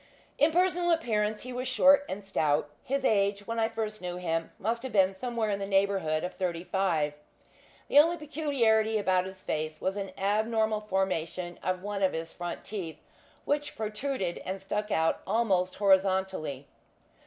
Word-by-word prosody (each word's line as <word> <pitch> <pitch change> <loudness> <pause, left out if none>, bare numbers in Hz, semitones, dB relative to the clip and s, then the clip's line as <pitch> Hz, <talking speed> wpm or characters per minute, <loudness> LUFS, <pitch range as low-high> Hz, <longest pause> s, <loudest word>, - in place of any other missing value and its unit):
In 300 - +6
personal 355 0 +2
appearance 215 -10 +1
he 255 0 -6
was 250 +1 -3
short 275 +4 +5
and 195 +2 -5
stout. 150 -6 0
His 275 0 -1
age, 200 -2 +2
when 230 +1 -3
I 225 0 +2
first 215 -2 -4
knew 180 -1 -4
him, 165 -2 -2
must 230 +4 -1
have 260 0 -5
been 190 -2 +4
somewhere 225 +1 -2
in 200 - -1
the 195 - -3
neighbourhood 195 -5 +1
of 180 - -3
thirty 175 -3 -2
five. 170 -6 0 0.7
The 285 - +6
only 335 +3 +5
peculiarity 260 -8 +1
about 185 -3 +2
his 190 0 -9
face 155 0 -3
was 190 +2 -1
an 195 -1 -4
abnormal 220 +2 +1
formation 185 -3 -2
of 185 0 -2
one 205 -1 -3
of 190 - +3
his 165 0 -5
front 175 -1 -6
teeth, 175 -7 -5 0.5
which 295 +1 -1
protruded, 215 -3 -3
and 190 +1 -5
stuck 210 +2 -3
out 160 -4 +1
almost 190 -4 +1
horizontally. 190 -7 +1
200 Hz, 165 wpm, -29 LUFS, 185-225 Hz, 0.7 s, In